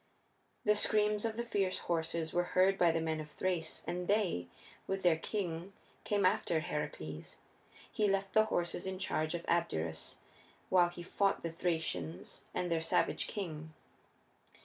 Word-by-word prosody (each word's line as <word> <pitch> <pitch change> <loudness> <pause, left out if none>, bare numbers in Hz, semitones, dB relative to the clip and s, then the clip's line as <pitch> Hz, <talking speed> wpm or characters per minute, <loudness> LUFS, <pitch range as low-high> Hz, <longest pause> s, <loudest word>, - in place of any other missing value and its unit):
The 210 - +6
screams 210 0 +2
of 225 -1 -2
the 235 - 0
fierce 195 -5 0
horses 165 -1 -1
were 175 - +3
heard 190 +1 +6
by 175 -3 +4
the 165 0 0
men 160 -1 -1
of 155 0 -6
Thrace, 170 -1 -2
and 180 +1 -3
they, 195 - +1 0.4
with 195 0 -2
their 175 -2 +6
king, 175 +1 -3 0.3
came 205 -2 +2
after 170 -2 +3
Heracles. 80 - -4 0.5
He 210 - +2
left 195 0 0
the 215 0 +6
horses 175 -3 -1
in 190 0 -3
charge 155 -3 -1
of 170 - -5
Abderus 80 - -1 0.5
while 180 -2 +5
he 175 0 -8
fought 195 +3 +1
the 165 - -2
Thracians 160 - -3
and 175 -1 -2
their 165 -1 +2
savage 165 - +1
king. 160 -6 -5
175 Hz, 155 wpm, -34 LUFS, 160-195 Hz, 0.5 s, The